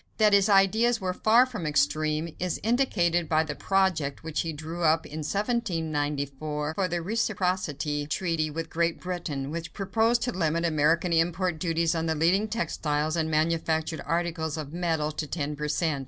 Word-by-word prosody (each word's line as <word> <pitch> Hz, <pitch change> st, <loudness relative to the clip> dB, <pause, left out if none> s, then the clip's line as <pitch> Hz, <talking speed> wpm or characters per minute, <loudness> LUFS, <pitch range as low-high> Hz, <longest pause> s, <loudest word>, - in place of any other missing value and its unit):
That 215 Hz, -2 st, +4 dB
his 200 Hz, +1 st, +5 dB
ideas 220 Hz, +4 st, +4 dB
were 185 Hz, -2 st, -2 dB
far 225 Hz, +6 st, +5 dB
from 215 Hz, -11 st, -5 dB
extreme 155 Hz, +2 st, 0 dB
is 180 Hz, -2 st, -2 dB
indicated 175 Hz, -, +1 dB
by 155 Hz, 0 st, +3 dB
the 155 Hz, -1 st, -4 dB
project 175 Hz, -6 st, 0 dB
which 160 Hz, -1 st, -2 dB
he 165 Hz, -, -3 dB
drew 160 Hz, +3 st, -6 dB
up 160 Hz, 0 st, +3 dB
in 155 Hz, +2 st, -7 dB
1794 155 Hz, -, -2 dB
for 190 Hz, +4 st, 0 dB
a 175 Hz, -1 st, -1 dB
reciprocity 175 Hz, -7 st, -1 dB
treaty 165 Hz, -1 st, -1 dB
with 160 Hz, +2 st, -5 dB
Great 170 Hz, 0 st, 0 dB
Britain, 155 Hz, -6 st, -4 dB
which 165 Hz, 0 st, -5 dB
proposed 225 Hz, +4 st, +1 dB
to 245 Hz, -, -1 dB
limit 170 Hz, -3 st, 0 dB
American 165 Hz, +2 st, +2 dB
import 165 Hz, +1 st, +1 dB
duties 165 Hz, 0 st, +1 dB
on 165 Hz, 0 st, -1 dB
the 160 Hz, -, 0 dB
leading 180 Hz, +7 st, +2 dB
textiles 155 Hz, -9 st, -1 dB
and 160 Hz, -1 st, 0 dB
manufactured 160 Hz, 0 st, 0 dB
articles 165 Hz, 0 st, -2 dB
of 150 Hz, -1 st, -6 dB
metal 165 Hz, -3 st, 0 dB
to 150 Hz, 0 st, -4 dB
ten 150 Hz, -1 st, -3 dB
per 150 Hz, +1 st, -3 dB
cent. 155 Hz, -1 st, 0 dB
165 Hz, 170 wpm, -27 LUFS, 155-185 Hz, -, his